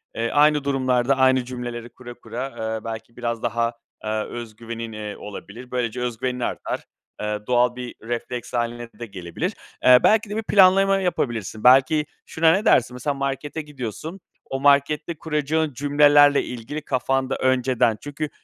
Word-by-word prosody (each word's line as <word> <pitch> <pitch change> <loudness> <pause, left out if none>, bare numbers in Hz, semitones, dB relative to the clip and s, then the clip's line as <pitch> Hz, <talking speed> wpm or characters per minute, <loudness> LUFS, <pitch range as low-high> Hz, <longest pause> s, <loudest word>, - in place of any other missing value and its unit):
Eee, 115 +1 -1
aynı 150 0 +4
durumlarda 130 -1 +1
aynı 130 -1 +4
cümleleri 120 -1 -6
kura 120 0 -11
kura, 120 +3 -6 0.3
eee, 110 - -10
belki 115 +1 -7
biraz 120 -2 -3
daha, 115 0 0 0.3
eee, 110 - -3
öz 115 -3 -8
güvenin, 115 0 -6
eee, 105 -1 -6
olabilir. 105 +4 -10
Böylece 125 -1 -2
öz 120 -2 -2
güvenin 125 +1 -2
artar. 120 - -3 0.4
Eee, 105 0 -2
doğal 125 0 +3
bir 125 -1 -7
refleks 120 +1 -5
hâline 120 0 -2
de 120 - -5
gelebilir. 90 -5 -4 0.3
Eee, 125 0 +8
belki 220 -1 +4
de 210 - -4
bir 225 - -2
planlama 195 -1 +5
yapabilirsin. 115 - -2
Belki, 135 +4 +5 0.2
şuna 160 0 +3
ne 195 +6 +1
dersin? 125 - +3
Mesela 135 +4 -2
markete 140 +3 -3
gidiyorsun, 150 - -7 0.3
o 135 - -4
markette 145 +3 +2
kuracağın 155 -1 -1
cümlelerle 145 +1 +5
ilgili 125 +6 -6
kafanda 135 -1 -1
önceden, 125 -3 +2
çünkü 145 +1 -4
125 Hz, 155 wpm, -23 LUFS, 120-145 Hz, 0.4 s, Eee